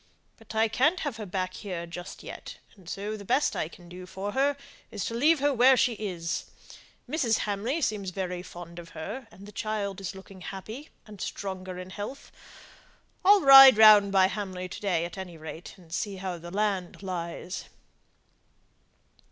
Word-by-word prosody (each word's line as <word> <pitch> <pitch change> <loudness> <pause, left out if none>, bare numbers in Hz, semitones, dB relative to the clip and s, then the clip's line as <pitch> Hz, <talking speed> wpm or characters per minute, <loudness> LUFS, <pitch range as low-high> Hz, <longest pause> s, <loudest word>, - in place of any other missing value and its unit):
But 225 -1 -12
I 220 +1 +4
can't 285 - +2
have 285 -7 -3
her 215 -2 -6
back 185 0 -2
here 180 -4 -5
just 175 +2 -9
yet; - - -9 0.2
and 185 -5 -14
so 205 +2 -4
the 205 - -9
best 260 +8 +1
I - - -1
can 175 +1 -15
do 180 +1 -10
for 195 +2 -5
her 280 +4 +1 0.3
is 210 -4 -4
to - - -3
leave 300 +8 +4
her 290 0 +3
where 255 +1 +6
she 245 - +3
is. 180 -6 -4 0.6
Mrs. 245 -8 +1
Hamley 215 +10 -1
seems 210 -7 -1
very 180 -1 -4
fond 175 -1 -10
of 170 -1 -11
her, 220 +10 -6
and 200 - -14
the 210 - -11
child 205 -2 -3
is 195 0 -5
looking 190 0 -12
happy, 215 - -8 0.2
and 210 -2 -11
stronger 185 -2 -5
in 185 +1 -8
health. 210 +8 -7 0.9
I'll 405 +1 +7
ride 270 -4 +10
round 210 -2 +8
by 190 -1 +5
Hamley 190 -2 -3
to - - -8
day 175 -5 0
at 175 +3 -7
any 180 -3 -7
rate, 160 +2 -9
and 170 -3 -14
see 200 +2 -2
how 185 -2 -5
the 170 +1 -9
land 195 -1 -2
lies." 180 0 -5
200 Hz, 180 wpm, -28 LUFS, 180-225 Hz, 0.9 s, ride